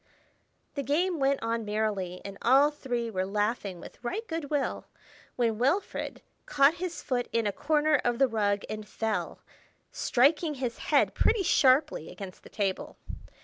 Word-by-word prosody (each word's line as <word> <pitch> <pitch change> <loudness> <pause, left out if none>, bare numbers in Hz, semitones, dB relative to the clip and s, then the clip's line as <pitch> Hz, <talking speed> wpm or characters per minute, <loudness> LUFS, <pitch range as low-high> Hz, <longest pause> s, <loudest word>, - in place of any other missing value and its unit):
The 280 - -2
game 325 +5 0
went 275 -1 +1
on 230 0 -1
merrily, 210 -4 -2
and 200 0 -6
all 275 +5 +5
three 245 -5 -3
were 185 -2 -1
laughing 205 -1 -1
with - - -13
right 430 - -3
good 325 -3 -4
will, 290 -2 -1 0.5
when 230 -3 0
Wilfred 280 +11 -1 0.2
caught 285 0 +5
his 360 -2 -4
foot 245 -3 -1
in 230 -1 +1
a 205 - +1
corner 300 +3 +2
of 240 -1 +1
the 270 +1 +4
rug 205 -3 0
and 215 -1 -6
fell, 220 -2 -2 0.5
striking 295 +5 +2
his 250 -3 -4
head - - +4
pretty 440 -4 +2
sharply 270 - +3
against 185 0 -9
the - - -14
table. 195 -3 -2
245 Hz, 155 wpm, -28 LUFS, 210-290 Hz, 0.5 s, all